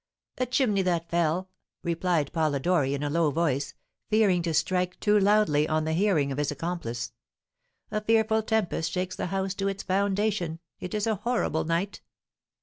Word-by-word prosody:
"A 255 Hz, -, +1 dB
chimney 235 Hz, -5 st, +2 dB
that 170 Hz, -2 st, -1 dB
fell," 170 Hz, +2 st, +1 dB, 0.4 s
replied 170 Hz, -3 st, 0 dB
Polidori, 150 Hz, -2 st, +1 dB
in 140 Hz, -, -4 dB
a 145 Hz, -, -1 dB
low 165 Hz, -1 st, +2 dB
voice, 145 Hz, -3 st, -1 dB, 0.3 s
fearing 210 Hz, -5 st, +3 dB
to 170 Hz, -1 st, -1 dB
strike 180 Hz, +3 st, 0 dB
too 210 Hz, 0 st, +3 dB
loudly 195 Hz, -7 st, +3 dB
on 155 Hz, 0 st, +1 dB
the 160 Hz, -, 0 dB
hearing 165 Hz, -6 st, +2 dB
of 135 Hz, -, -3 dB
his 145 Hz, -, 0 dB
accomplice. 145 Hz, -7 st, -4 dB, 0.8 s
"A 215 Hz, 0 st, -1 dB
fearful 220 Hz, 0 st, +3 dB
tempest 215 Hz, -7 st, 0 dB
shakes 185 Hz, 0 st, -2 dB
the -, -, -3 dB
house 190 Hz, +1 st, -1 dB
to 195 Hz, 0 st, -2 dB
its 195 Hz, 0 st, -3 dB
foundation; 195 Hz, -3 st, 0 dB, 0.2 s
it 180 Hz, -, -5 dB
is 210 Hz, -, 0 dB
a 220 Hz, -2 st, 0 dB
horrible 235 Hz, -7 st, 0 dB
night!" 170 Hz, +5 st, -1 dB
180 Hz, 165 wpm, -27 LUFS, 160-205 Hz, 0.8 s, fearing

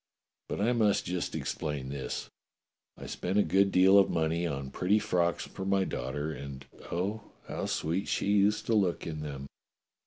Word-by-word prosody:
But -, -, -3 dB
I 115 Hz, +4 st, +2 dB
must 110 Hz, -4 st, +2 dB
just 90 Hz, 0 st, -2 dB
explain 75 Hz, -4 st, -3 dB
this: 70 Hz, -1 st, -4 dB, 0.7 s
I -, -, -9 dB
spent 95 Hz, +3 st, -2 dB
a 105 Hz, -, +6 dB
good 100 Hz, 0 st, +3 dB
deal 95 Hz, +2 st, +7 dB
of 100 Hz, -, +4 dB
money 80 Hz, +1 st, 0 dB
upon 70 Hz, -4 st, -3 dB
pretty 95 Hz, +8 st, +2 dB
frocks 90 Hz, -5 st, 0 dB
for -, -, -7 dB
my 95 Hz, 0 st, +2 dB
daughter, 75 Hz, -2 st, -3 dB
and, 70 Hz, -2 st, -7 dB, 0.3 s
oh! 100 Hz, +6 st, -1 dB, 0.3 s
how -, -, -3 dB
sweet 85 Hz, +5 st, -1 dB
she -, -, 0 dB
used 105 Hz, +1 st, +3 dB
to 115 Hz, -, +1 dB
look 95 Hz, -5 st, +1 dB
in 80 Hz, -2 st, -4 dB
them. 70 Hz, -2 st, -5 dB
90 Hz, 175 wpm, -30 LUFS, 75-100 Hz, 0.7 s, deal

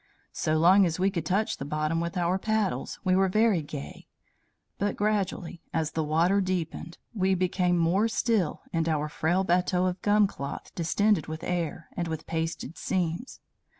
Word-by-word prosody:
So 155 Hz, 0 st, 0 dB
long 185 Hz, +5 st, +6 dB
as 160 Hz, -, -2 dB
we 190 Hz, +2 st, +2 dB
could 170 Hz, -5 st, -3 dB
touch 200 Hz, +5 st, 0 dB
the -, -, -5 dB
bottom 155 Hz, +3 st, -1 dB
with 170 Hz, +1 st, -3 dB
our 180 Hz, +2 st, +1 dB
paddles, 215 Hz, -2 st, -1 dB
we 185 Hz, -2 st, +3 dB
were 190 Hz, 0 st, +3 dB
very 215 Hz, -2 st, +3 dB
gay; 75 Hz, -, -8 dB, 0.7 s
but 205 Hz, +1 st, 0 dB
gradually, 200 Hz, -5 st, -1 dB
as 155 Hz, -1 st, 0 dB
the 160 Hz, 0 st, -1 dB
water 170 Hz, +6 st, +2 dB
deepened, 175 Hz, -2 st, -3 dB, 0.2 s
we 190 Hz, -3 st, +2 dB
became 180 Hz, -1 st, +1 dB
more 175 Hz, +6 st, +3 dB
still 220 Hz, -7 st, 0 dB
in 165 Hz, -1 st, 0 dB
our 150 Hz, -1 st, 0 dB
frail 175 Hz, +5 st, 0 dB
bateau 180 Hz, 0 st, +2 dB
of 180 Hz, 0 st, -2 dB
gum 210 Hz, 0 st, +4 dB
cloth 140 Hz, -7 st, -6 dB
distended 190 Hz, +1 st, +1 dB
with 155 Hz, 0 st, -6 dB
air, 170 Hz, -3 st, -2 dB
and 175 Hz, -1 st, -2 dB
with 160 Hz, -1 st, -5 dB
pasted 165 Hz, -1 st, -4 dB
seams. 175 Hz, +6 st, -2 dB
175 Hz, 170 wpm, -27 LUFS, 160-195 Hz, 0.7 s, long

